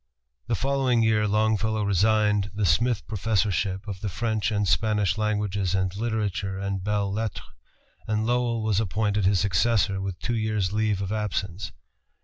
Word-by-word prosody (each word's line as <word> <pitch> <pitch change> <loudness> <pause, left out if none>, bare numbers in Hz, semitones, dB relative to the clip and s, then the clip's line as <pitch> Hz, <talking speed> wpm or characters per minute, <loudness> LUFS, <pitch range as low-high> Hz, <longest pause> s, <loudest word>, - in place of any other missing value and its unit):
The 120 - +1
following 130 -1 +1
year 110 -1 +2
Longfellow 110 +1 +1
resigned 105 +1 +2
the 105 -1 0
Smith 110 +7 +2
Professorship 105 -2 -1
of 100 -2 -6
the 105 - -2
French 110 +3 -1
and 105 -1 0
Spanish 105 -1 +2
Languages 105 -3 -1
and 95 0 -1
Literature 105 -3 -2
and 100 -1 -3
Belles 100 -1 0
Lettres, 110 -1 -3 0.6
and 110 0 0
Lowell 120 -1 0
was 110 -2 +1
appointed 105 -1 0
his 95 -1 +3
successor 100 +1 +2
with 95 -2 -4
two 120 - -2
years' 110 -4 -1
leave 105 -2 0
of 95 - -4
absence. 100 -3 -3
105 Hz, 150 wpm, -25 LUFS, 100-110 Hz, 0.6 s, his